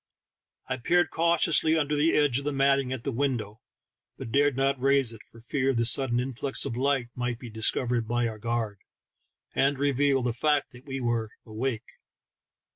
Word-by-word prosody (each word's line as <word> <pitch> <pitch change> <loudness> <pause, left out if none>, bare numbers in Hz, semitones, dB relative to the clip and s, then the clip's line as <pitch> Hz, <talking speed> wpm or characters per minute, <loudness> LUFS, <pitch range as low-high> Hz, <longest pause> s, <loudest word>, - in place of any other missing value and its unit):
I - - -2
peered 175 +8 +2
cautiously 165 -1 +2
under 150 -1 0
the 150 +3 +2
edge 145 -4 +3
of 140 - -8
the 145 - 0
matting 135 -1 +2
at 130 -3 -4
the 140 - -2
window, 120 -4 -2 0.6
but 115 - -7
dared 140 0 +2
not 135 -1 +1
raise 135 -3 +3
it, 110 - -12
for 115 - -16
fear 135 +2 0
the 115 0 +1
sudden 120 0 +3
influx 135 +2 -2
of 115 - -3
light 135 -1 0
might 125 -1 -3
be 120 -1 -10
discovered 115 +1 0
by 120 +1 0
our 110 -1 -6
guard, 115 -2 -2 0.7
and 140 0 +2
reveal 140 -1 +1
the 120 -1 0
fact 145 +3 +1
that 125 +1 -15
we 135 0 -4
were 120 -3 -1 0.2
awake. 115 +1 -5
130 Hz, 180 wpm, -27 LUFS, 120-140 Hz, 0.7 s, edge